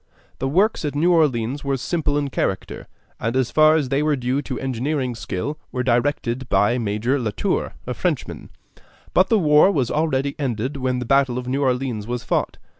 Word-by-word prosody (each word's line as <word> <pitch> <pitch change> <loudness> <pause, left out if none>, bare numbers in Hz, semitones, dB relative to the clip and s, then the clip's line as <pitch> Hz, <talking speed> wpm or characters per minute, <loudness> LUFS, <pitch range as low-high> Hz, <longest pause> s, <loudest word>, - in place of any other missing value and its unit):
The 135 - -1
works 190 +10 +2
at 145 -1 -3
New 170 +5 +3
Orleans 140 -4 +1
were 140 -1 0
simple 145 +1 -1
in 145 -2 -2
character, 95 -6 -3 0.3
and 115 +2 -2
as 130 -2 +1
far 155 0 +5
as 145 -5 0
they 140 +1 +1
were 150 -1 +2
due 130 +2 -1
to 130 -3 -5
engineering 130 0 -2
skill 125 +7 -4
were 125 -1 -2
directed 125 0 0
by 120 +4 +2
Major 115 +5 0
Latour, 110 -4 -2
a - - -3
Frenchman; - - -3 0.6
but 185 - +4
the 225 - +4
war 150 0 +5
was 130 -9 0
already 140 -3 0
ended 130 0 -2
when 130 -1 -1
the 125 - -3
battle 135 -1 +2
of 125 0 -5
New 135 +2 -1
Orleans 125 -5 -1
was 120 0 -3
fought. - - -1
135 Hz, 190 wpm, -22 LUFS, 125-150 Hz, 0.6 s, far